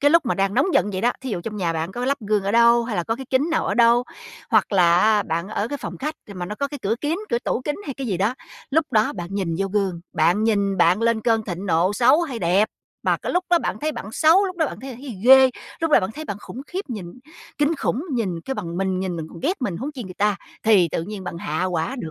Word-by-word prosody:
cái 290 +1 +4
lúc 335 -4 +4
mà - - +1
đang 195 0 0
nóng 270 - +3
giận 205 - +3
vậy 185 - -2
đó, 240 +3 +2
thí 265 - -4
dụ 185 - -2
trong 215 +3 -6
nhà 175 -4 0
bạn 165 +3 -3
có 245 - -3
lắp 280 +2 0
gương 210 -1 0
ở 200 - 0
đâu 235 0 +5
hay 230 -4 -3
là 175 - 0
có 225 - -1
cái 265 +1 -8
kính 275 +5 +2
nào 320 - 0
ở - - 0
đâu, 235 +1 +5 0.5
hoặc - - +3
là 175 -3 +5
á 215 0 +4
bạn 170 0 -3
ở 215 +1 -2
cái 285 +1 -4
phòng - - -7
khách 305 +3 -3
thì 200 - -9
mà 180 -1 -5
nó 210 - -5
có 280 +5 -2
cái 290 0 -7
cửa 205 +3 +1
kiếng 310 +4 -1
cửa 235 - +2
tủ 245 - -2
kính 295 - -2
hay 275 - -4
cái 270 -1 -5
gì 195 -6 -1
đó, 205 +7 0 0.4
lúc 300 -1 +1
đó 215 -1 +3
bạn 175 -4 -5
nhìn 190 -4 -1
vô 195 - 0
gương, 195 -4 -1
bạn 175 +7 +2
nhìn 200 -3 +1
bạn 180 +4 +3
lên 230 -1 +2
cơn 225 -2 +2
thịnh 185 +1 -5
nộ 175 +3 +2
xấu 255 +8 +5
hay 265 -8 -4
đẹp, 185 +4 +2 0.3
mà - - +2
cái - - -4
lúc 360 +1 +1
đó 345 - +5
bạn - - -3
thấy 310 +1 -1
bạn 210 -6 -7
xấu, 330 - +5
lúc 365 -1 -6
đó 320 -3 +2
bạn 235 - -7
thấy 270 - -7
là 245 - -8
thấy 255 -4 -8
ghê, 265 0 +8 0.3
lúc 325 - 0
đó - - +6
bạn 185 - -2
thấy 310 - -6
bạn 205 - -4
khủng 250 - -9
khiếp 370 -4 -5
nhìn 205 -7 -5 0.5
kinh 295 +3 +2
khủng, 275 0 -1
nhìn 195 -9 -1
kêu 270 - -3
bằng 170 -7 -5
mình 190 0 -1
nhìn, 185 -2 -3
mình 160 - -5
còn 165 - -11
ghét 345 - -1
mình 195 -8 -1
huống 275 - -5
chi 255 -5 -7
người 185 -1 -9
ta, 205 0 +1 0.3
thì 200 -6 +5
tự 165 - -1
nhiên 200 +1 -7
bạn 175 - -5
hạ 155 +2 -2
hỏa 180 +7 -2
được 160 - -5
220 Hz, 295 wpm, -22 LUFS, 185-265 Hz, 0.5 s, ghê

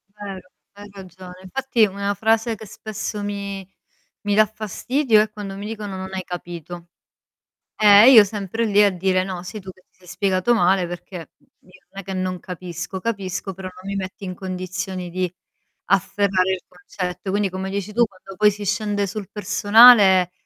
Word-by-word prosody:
Vero, 195 -3 -9 0.2
hai 205 0 -12
ragione. 185 -2 -12
Infatti 235 +3 +1
una 200 0 -2
frase 225 +2 +1
che 220 0 -11
spesso 210 0 -6
mi 200 -2 -5 0.5
mi 205 -1 -1
dà 215 0 +6
fastidio 220 +3 +1
è 215 - -1
quando 205 -2 -7
mi 200 +1 -7
dicono: 210 -3 -6
"Non 190 0 -7
hai 190 -1 -4
capito." 175 -1 -8 0.9
Eh 210 0 +7
e - - +9
io 220 -4 +9
sempre 205 +2 -3
lì 205 -1 +4
a 205 - +5
dire: 185 0 0
"No 185 -2 -6
sei 210 +4 -8
tu 190 -1 -9
che 185 - -18
ti - - -38
sei 180 - -21
spiegato 185 +5 +1
male, 185 -3 +2
perché 175 +2 -8 0.4
io 185 0 -21
non 195 - -7
è - - -10
che 190 +1 -7
non 185 -1 -3
capisco, 180 +1 -7
capisco 195 -3 -4
però 190 0 -8
non 185 +1 -10
mi 200 - -3
metti 195 +2 -6
in 185 -1 -5
condizioni 185 0 -5
di 180 0 -2 0.5
afferrare 195 0 +1
il 185 -1 -4
concetto." 180 +1 -6
Quindi 200 0 0
come 190 +1 -5
dici 200 +1 -4
tu, 235 +2 +4
quando 195 0 -14
poi 210 +2 +5
si 205 0 -7
scende 205 0 -1
sul 200 -1 -6
personale, 205 -2 +6
195 Hz, 180 wpm, -21 LUFS, 185-210 Hz, 0.9 s, e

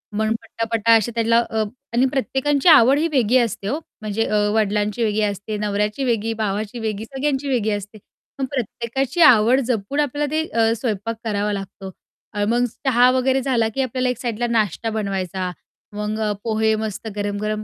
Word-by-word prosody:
मग 220 +1 0
पट्टापट्टा 230 0 -1
असे 220 +2 -2
त्याला. 230 0 +3 0.5
आणि 245 +3 +3
प्रत्येकांची 275 +3 0
आवडही 285 +2 +6
वेगळी 255 -3 +3
असते 225 -4 -1
हो. 290 +8 -1 0.2
म्हणजे 215 +1 -1
अ, 215 - 0 0.2
वडिलांची 210 +1 0
वेगळी 215 0 +1
असते, 205 +1 -3
नवऱ्याची 210 +4 -1
वेगळी, 225 -2 0
भावाची 215 +1 -3
वेगळी, 220 -1 -3
सगळ्यांची 270 +2 -2
वेगळी 230 -5 +1
असते. 205 +1 -5 0.4
पण 270 - -1
प्रत्येकाची 260 - -2
आवड 245 -2 +6
जपून 240 +4 -1
आपल्याला 290 0 -1
ते 315 +1 0
अ, 225 0 +2
स्वयंपाक 225 -1 -2
करावा 210 -1 -1
लागतो. 195 -1 -7 0.4
अ, 205 -1 -1
मग 240 +1 +2 0.2
चहा 250 -1 +5
वगैरे 260 +1 +1
झाला, 240 -4 +1
की 270 - +1
आपल्याला 255 0 -1
एक 250 - -2
साईडला 240 -1 -2
नाश्ता 225 -1 0
बनवायचा. 190 -4 -3 0.4
मग 210 +1 -3
अ, 215 -1 0
पोहे 220 -1 +1
मस्त 215 0 -5
गरम-गरम 210 +1 -2
225 Hz, 165 wpm, -21 LUFS, 210-255 Hz, 0.5 s, आवडही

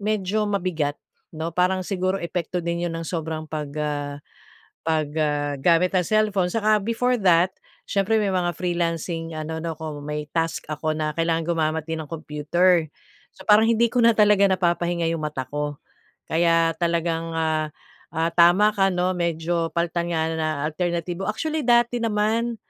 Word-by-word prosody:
medyo 210 0 0
mabigat 175 -8 -1 0.3
'no, 160 0 -4
parang 185 +1 +2
siguro 185 0 -1
epekto 170 +1 -3
din 170 0 -2
yun 170 - -2
ng 165 0 -5
sobrang 160 -2 -4
pag, 150 -2 -4
ah, 145 -1 -2 0.7
pag, 155 -2 +1
ah, 145 -1 0
gamit 170 +5 +3
ang 180 -2 +2
cellphone. 210 -4 +2
Saka 215 -1 +3
before 245 +3 0
that, 180 -2 +4 0.4
siyempre 200 +2 +1
may 200 - +1
mga 175 -2 0
freelancing 165 -1 -2
ano 155 +1 -4
'no 165 0 -4
ko, 155 -1 -6
may 150 +1 -5
task 165 0 -2
ako 155 +1 -1
na 155 0 -1
kailangan 165 0 +1
gumamit 160 -2 0
din 160 -1 -3
ng 150 - -13
computer. 165 +2 +1 0.5
So - - -12
parang 215 +2 +6
hindi 230 0 +4
ko 250 - +2
na 230 -1 +5
talaga 205 -2 +5
napapahinga 175 -2 0
yung 165 - -3
mata 150 -4 -3
ko. 145 0 -3 0.5
Kaya 165 0 +2
talagang, 165 -1 -1
ah, 155 -1 0 0.4
ah, 165 +1 0
tama 175 +5 +5
ka 195 -1 +3
'no 180 0 +1
medyo 170 -1 -1
palitan 170 0 -1
nga 160 -1 0
na 160 -1 -1 0.2
alternatibo, 175 +2 -2
actually 310 +8 -2
dati 240 0 +3
naman, 225 +2 0
170 Hz, 160 wpm, -23 LUFS, 160-195 Hz, 0.7 s, parang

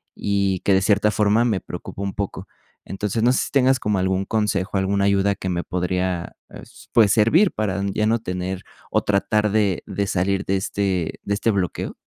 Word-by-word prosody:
y 100 -2 0
que 100 - +2
de 95 - +4
cierta 105 +2 +2
forma 105 +3 +2
me 105 -6 +1
preocupa 90 +2 -8
un 100 - -3
poco. 100 -1 -4 0.4
Entonces, 105 +3 -2
no 125 - +5
sé - - +1
si - - -9
tengas 130 -2 +3
como 105 -1 0
algún 95 +1 0
consejo, 105 -3 -1
alguna 100 +1 +1
ayuda 100 0 +2
que 95 - -6
me 85 -1 -1
podría, 90 -1 -2
eh, - - -11
s - - -16
pues 110 -4 +5
servir 150 - +4
para 100 -2 -2
ya 110 - 0
no 115 +1 +2
tener 90 -2 -4 0.3
o - - +2
tratar 105 +1 +1
de 105 -4 +1
de 100 +1 -2
salir 95 +1 0
de 95 0 +1
este 95 -3 -2
de 100 - -1
este 110 +2 +1
bloqueo. 95 -3 -2
100 Hz, 200 wpm, -22 LUFS, 95-105 Hz, 0.4 s, no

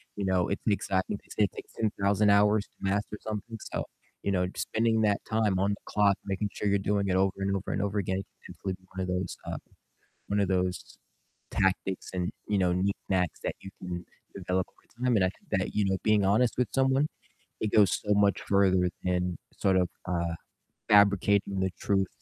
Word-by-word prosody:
you 100 - -2
know, 95 -2 +2
it's 100 - -2
an 105 - +4
exciting 95 0 -1
they - - -23
say 105 - +1
it - - -5
takes - - -10
10,000 100 -1 +1
hours 105 0 +4
to - - -41
master 100 +2 -1
something, 110 +1 -5 0.2
so, - - -1 0.4
you 100 - 0
know, 90 -1 +1
just 90 - -4
spending 110 0 +2
that 105 -2 +2
time 110 -4 +1
on 100 +1 +2
the 100 - -2
clock, 100 -2 +3
making 100 +1 -1
sure 105 - -2
you're 100 0 +3
doing 100 0 0
it 95 - +1
over 95 0 +3
and 100 0 +1
over 95 - -3
and - - -1
over 100 0 0
again 95 -1 -1 0.3
can - - -10
definitely 95 - -4
be 95 0 -13
one 95 - -2
of 90 - -2
those, 90 -1 -2
uh, - - -3 0.7
one 100 0 +1
of 100 - +1
those 90 -1 -1 0.6
tactics 95 0 0
and, 90 -1 -1 0.2
you 105 - +1
know, 90 -2 +2
knick-knacks 95 -2 0
that - - -3
you 95 - -8
can 90 -1 -5 0.3
develop 95 -1 -1
over - - -30 0.2
time, 125 -2 +3
and 100 - +4
I - - +2
think - - -18
that, - - -3
you 105 - +2
know, 95 0 +1
being 105 -2 +3
honest 110 +5 +3
with 125 -4 +1
someone, 135 +2 +3 0.5
it 110 - -1
goes 105 -4 +5
so 105 0 +1
much 100 -1 +3
further 95 -2 +3 0.2
than 90 -1 0 0.2
sort 95 -1 +3
of, 90 -1 +3 0.2
uh, 85 -2 -1 0.6
fabricating 100 -1 +4
the 95 - +1
truth 95 -2 +1
100 Hz, 210 wpm, -29 LUFS, 95-105 Hz, 0.7 s, goes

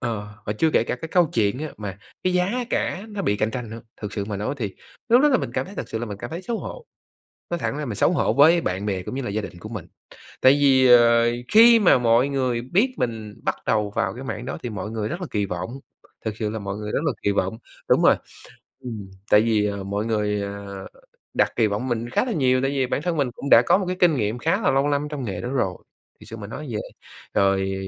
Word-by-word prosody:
ờ, 110 -4 -3 0.2
và 105 - 0
chưa 160 +9 +1
kể 115 - +3
cả 125 - -2
cái 160 - -7
câu 175 +1 +4
chuyện 105 +1 +1
á 155 +1 -4
mà 100 -2 -6 0.3
cái 185 - +2
giá 180 0 +2 0.2
cả 195 +4 -1
nó 205 -2 -4
bị 105 - +1
cạnh 110 +2 0
tranh 120 -2 -5
nữa, 115 +1 -7 0.2
thực 105 - -4
sự 100 -2 -3
mà 100 -1 -4
nói 105 +8 -2
thì 105 -6 -3 0.3
lúc 245 +3 +6
đó 295 - +6
là 260 - +4
mình - - -4
cảm - - -1
thấy 200 - -11
thật - - -5
sự 110 - -3
là 120 - -4
mình 100 -1 -7
cảm 120 - -7
thấy 170 +3 -5
xấu 225 +4 -3
hổ. - - -8 0.6
Nói 175 - -1
thẳng 140 - -2
ra 150 - -3
mình 110 -5 -4
xấu - - +3
hổ 165 - +1
với 155 +7 +6
bạn 95 - -2
bè 95 -3 -1
cũng - - -6
như 135 - -3
là 110 - -4
gia 110 +1 -2
đình 90 - -8
của 105 +5 -9
mình. 110 -5 -7 0.5
Tại 130 - +7
vì, 135 -2 +4
ờ, 115 -1 +6 0.2
khi 230 +1 +8
mà 175 -9 +5
mọi 120 +2 +3
người 130 -4 -1
biết 205 - +1
mình 110 -3 -3
bắt - - 0
đầu 105 -2 +1
vào 95 0 0
cái 130 +3 -8
mảng - - -5
đó - - -4
thì 120 - -3
mọi 105 0 -5
người 110 -2 -3
rất 170 - -5
là 180 - -4
kỳ 105 -2 0
vọng, 90 +4 -4 0.5
thực 110 -1 -3
sự 110 -1 -2
là 110 - -4
mọi 100 -1 -5
người 105 0 -5
rất - - +1
là 150 - +1
kỳ 100 - +2
vọng. 100 +2 -1 0.3
Đúng - - +4
rồi. - - +6 0.7
Ừm, 105 -5 -6 0.2
tại 105 - +7
vì, 110 -2 +2
ờ, 100 -1 -3
mọi 100 +3 -2
người, 105 -2 0
ờ, 100 -1 -7 0.5
đặt - - +2
kỳ 115 - +4
vọng 105 +5 -2
mình 120 0 -2
khá 130 - +1
là 250 - -3
nhiều, 130 -7 +2
tại 135 - +1
vì 135 -2 0
bản 140 - -2
thân 175 -1 -1
mình 135 -4 +1
cũng 140 - -6
đã 115 - +8
có - - +4
một 190 - -2
cái 185 - -2
kinh 170 -5 +5
nghiệm 110 +1 -1
khá 165 - +1
là - - +2
lâu 135 +2 +2
năm 145 0 0
trong 140 -4 -4
nghề 95 -5 -4
đó 120 - -4
rồi, 95 -9 0 0.5
thực - - -14
sự 115 - -8
mà 105 - -7
nói 145 +8 -7
vậy. 105 -2 -3 0.5
Rồi 95 0 +2
115 Hz, 270 wpm, -23 LUFS, 105-145 Hz, 0.7 s, khi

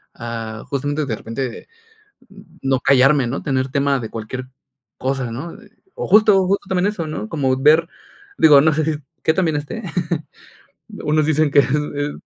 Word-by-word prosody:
ah, 115 -2 -6
justamente 145 +2 -2
de 115 -5 -2
repente 115 +3 -6 0.9
no 135 -1 +1
callarme, 135 -1 +4
¿no?, 135 - -4
tener 130 -1 -1
tema 140 0 +1
de 115 - -6
cualquier 120 +4 -6 0.5
cosa, 130 -2 -2
¿no? 150 +10 -6 0.4
O - - -4
justo 200 -2 +5
justo 200 +1 -1
también 190 +1 +1
eso, 200 -6 -3
¿no?, 110 -9 -5
como 135 -4 0
ver, 155 +4 +4 0.5
digo, 150 -3 +7
no 155 0 +3
sé, 155 +1 0
si 155 -2 -1 0.2
qué 160 - +3
tan 185 -1 +1
bien 155 -2 0
esté. 175 +10 -6 1.2
Unos 155 0 +2
dicen 155 -1 +2
que, 145 - +5
es 140 - +2
es 145 0 -1
145 Hz, 165 wpm, -20 LUFS, 130-155 Hz, 1.2 s, digo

